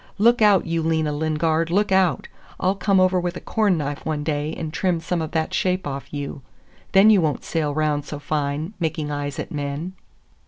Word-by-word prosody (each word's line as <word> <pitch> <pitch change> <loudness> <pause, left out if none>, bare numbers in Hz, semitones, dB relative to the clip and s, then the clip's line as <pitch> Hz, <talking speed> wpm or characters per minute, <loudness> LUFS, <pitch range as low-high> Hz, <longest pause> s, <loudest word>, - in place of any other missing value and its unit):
"Look 235 +3 +4
out, 205 -3 +5
you 165 0 -1
Lena 160 -1 0
Lingard, 160 +2 0
look 200 +3 +1
out! 190 -2 +2 0.3
I'll 185 - +2
come 195 0 +2
over 185 0 +3
with 175 0 -3
a - - -5
corn 210 -5 +1
knife 145 -1 -4
one 155 -2 -2
day 150 0 -1
and 155 -2 -5
trim 180 -2 0
some 165 +1 -2
of 160 - -3
that 160 -1 -1
shape 185 0 0
off 140 -1 -5
you. 145 -1 -5 0.5
Then 195 +3 +7
you 200 -4 +5
won't 150 -5 -1
sail 155 -3 -1
round 150 -1 0
so 150 - -6
fine, 145 +4 -2
making 155 -3 -2
eyes 145 -1 -3
at - - -4
the - - -7
men! 145 +5 -4
160 Hz, 205 wpm, -23 LUFS, 150-185 Hz, 0.5 s, Then